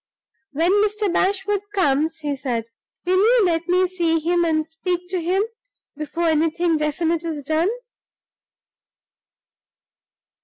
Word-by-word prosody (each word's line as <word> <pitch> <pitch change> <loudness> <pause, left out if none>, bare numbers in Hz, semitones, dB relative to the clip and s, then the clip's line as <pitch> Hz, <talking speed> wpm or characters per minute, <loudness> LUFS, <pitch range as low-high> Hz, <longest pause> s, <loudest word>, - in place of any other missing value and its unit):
"When 330 +5 +2
Mr. 420 -3 0
Bashwood 390 +1 +1
comes," 315 -2 +1
he 290 -1 -2
said, 235 -4 -3 0.4
"will 370 +1 +2
you 450 +1 +4
let 335 -1 0
me 365 +1 +3
see 345 -3 0
him, 345 +2 +1
and 315 -2 +1
speak 355 +3 -4
to 365 -1 -1
him, 370 +4 +1 0.5
before 305 +3 -4
anything 325 +2 +1
definite 320 +2 -1
is 315 -4 -4
done?" 315 +6 +1
335 Hz, 120 wpm, -22 LUFS, 310-370 Hz, 0.5 s, you